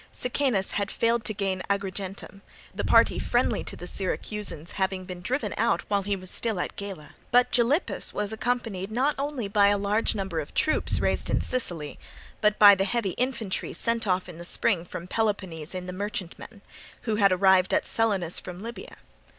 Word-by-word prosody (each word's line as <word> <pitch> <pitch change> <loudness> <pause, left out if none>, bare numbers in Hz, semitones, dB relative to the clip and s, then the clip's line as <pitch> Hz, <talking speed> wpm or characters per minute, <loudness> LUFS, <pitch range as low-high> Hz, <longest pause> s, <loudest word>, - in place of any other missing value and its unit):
Sicanus 250 -6 0
had 200 -1 -1
failed 230 0 +1
to - - -2
gain 195 -2 -1
Agrigentum, 195 0 -4 0.3
the - - -3
party - - +4
friendly - - +1
to - - -6
the 175 - -8
Syracusans 190 -2 -3
having 190 -1 -1
been 180 -1 -7
driven 220 -1 -1
out 170 - +2
while 200 -1 +3
he 200 +1 -1
was 185 -1 -5
still 220 -5 -1
at - - -3
Gela; 195 -7 -7 0.2
but 245 +1 +4
Gylippus 250 +8 +1
was 210 +1 -3
accompanied 220 -5 -2
not 265 +6 +2
only 280 -6 -2
by 200 0 +4
a 205 0 +3
large 205 +3 +1
number 190 -5 -2
of 150 - -7
troops 310 - +2
raised - - +1
in - - +2
Sicily, 175 -12 -3 0.4
but 210 0 +3
by 205 -1 +10
the 195 0 +1
heavy 205 -1 0
infantry 235 -4 -2
sent 230 -1 0
off 185 0 +1
in 175 -2 -10
the - - -7
spring 175 0 0
from 170 - -7
Peloponnese 185 -6 -2
in 180 0 -4
the 180 - -6
merchantmen, 200 +1 -5 0.4
who 220 -3 -1
had 200 -2 +5
arrived 185 0 +4
at - - +2
Selinus 200 -7 0
from 180 +2 -8
Libya. 235 +1 -8
200 Hz, 185 wpm, -27 LUFS, 185-225 Hz, 0.4 s, by